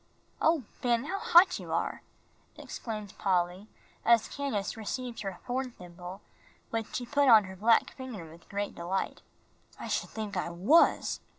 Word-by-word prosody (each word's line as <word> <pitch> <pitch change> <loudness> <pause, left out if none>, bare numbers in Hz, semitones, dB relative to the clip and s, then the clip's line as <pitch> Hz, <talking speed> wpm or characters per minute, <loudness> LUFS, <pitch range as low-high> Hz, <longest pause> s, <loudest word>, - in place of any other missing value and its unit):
"Oh, 320 -4 +3 0.2
Ben, 240 -1 +2
how 390 +6 -3
hot 360 +1 +6
you - - -8
are!" - - -1 0.6
exclaimed 215 -4 -6
Polly, 180 +1 0 0.4
as 230 -1 +4
Candace 265 -9 -3
received 235 +2 -4
her 195 -2 -3
horn 255 +1 -2
thimble, 180 +1 -9 0.5
which 225 -1 -3
she 245 - -2
put 285 +2 +3
on 220 -3 +9
her 190 0 -9
black 230 +7 +3
finger 240 - -7
with 165 +1 -16
great 200 0 -3
delight. 180 +3 -3 0.6
"I - - -6
sh'd - - -1
think 215 -3 -5
I 180 -1 -1
was. 190 - +3
220 Hz, 155 wpm, -30 LUFS, 190-255 Hz, 0.6 s, on